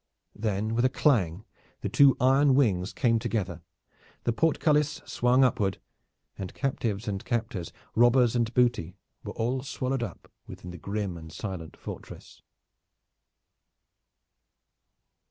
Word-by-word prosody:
Then 110 Hz, 0 st, -1 dB
with 120 Hz, +1 st, +1 dB
a 130 Hz, -, +4 dB
clang 105 Hz, -, +1 dB, 0.4 s
the -, -, -2 dB
two 140 Hz, -2 st, +5 dB
iron 135 Hz, +1 st, +4 dB
wings 100 Hz, -9 st, +2 dB
came 115 Hz, -3 st, +2 dB
together, 100 Hz, -8 st, -2 dB, 0.6 s
the 120 Hz, -, +1 dB
portcullis 150 Hz, +1 st, +2 dB
swung 125 Hz, +2 st, +3 dB
upward, 105 Hz, -6 st, +1 dB, 0.6 s
and 95 Hz, -2 st, -6 dB
captives 115 Hz, -6 st, -2 dB
and 100 Hz, -2 st, -3 dB
captors, 110 Hz, -7 st, -3 dB, 0.2 s
robbers 120 Hz, +1 st, +4 dB
and 115 Hz, -2 st, +1 dB
booty, 120 Hz, -8 st, +1 dB, 0.3 s
were -, -, -6 dB
all 125 Hz, +3 st, -1 dB
swallowed 130 Hz, -1 st, -2 dB
up 110 Hz, -7 st, -7 dB, 0.2 s
within 90 Hz, -, -9 dB
the 90 Hz, -, -9 dB
grim 100 Hz, 0 st, -3 dB
and 80 Hz, -1 st, -10 dB
silent 90 Hz, -4 st, -6 dB
fortress. -, -, -10 dB
115 Hz, 120 wpm, -28 LUFS, 95-130 Hz, 0.6 s, two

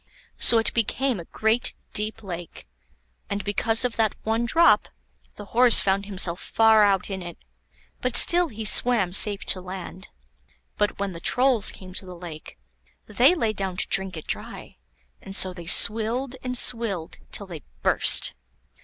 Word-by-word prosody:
So 235 Hz, -, +6 dB
it 225 Hz, -, -1 dB
became 240 Hz, +1 st, -2 dB
a 170 Hz, -, -10 dB
great 220 Hz, +6 st, -1 dB, 0.2 s
deep 215 Hz, +1 st, -2 dB
lake; 175 Hz, -3 st, -10 dB, 0.6 s
and 200 Hz, 0 st, -4 dB
because 225 Hz, +4 st, 0 dB
of 245 Hz, -, -4 dB
that 220 Hz, -2 st, 0 dB
one 225 Hz, +2 st, -2 dB
drop, 335 Hz, +7 st, +3 dB, 0.5 s
the 205 Hz, -, -11 dB
horse 245 Hz, 0 st, +5 dB
found 195 Hz, +1 st, -1 dB
himself 185 Hz, -3 st, -2 dB
far 220 Hz, -1 st, +2 dB
out 200 Hz, -1 st, 0 dB
in 190 Hz, -1 st, -6 dB
it, 175 Hz, -1 st, -10 dB, 0.6 s
but 250 Hz, -1 st, -2 dB
still 350 Hz, 0 st, +6 dB
he 220 Hz, -5 st, -8 dB
swam 215 Hz, -5 st, +3 dB
safe 205 Hz, 0 st, +2 dB
to 185 Hz, -, -1 dB
land. 185 Hz, +1 st, -10 dB, 0.7 s
But 205 Hz, 0 st, -2 dB
when 200 Hz, -1 st, -4 dB
the 170 Hz, -, -10 dB
Trolls 245 Hz, +2 st, +2 dB
came 185 Hz, -1 st, -10 dB
to 190 Hz, -, -6 dB
the 180 Hz, -, -10 dB
lake, 170 Hz, -3 st, -12 dB, 0.5 s
they 250 Hz, -, +2 dB
lay 225 Hz, -10 st, -2 dB
down 190 Hz, -3 st, -5 dB
to -, -, -3 dB
drink 190 Hz, -3 st, 0 dB
it 155 Hz, -, -10 dB
dry; -, -, -5 dB, 0.4 s
and 195 Hz, -, -8 dB
so 185 Hz, -2 st, +3 dB
they 175 Hz, -2 st, -12 dB
swilled 230 Hz, +7 st, +4 dB
and 250 Hz, 0 st, -2 dB
swilled 220 Hz, -10 st, 0 dB
till 200 Hz, -, -4 dB
they 170 Hz, -5 st, -10 dB, 0.2 s
burst. -, -, +2 dB
205 Hz, 165 wpm, -23 LUFS, 185-230 Hz, 0.7 s, So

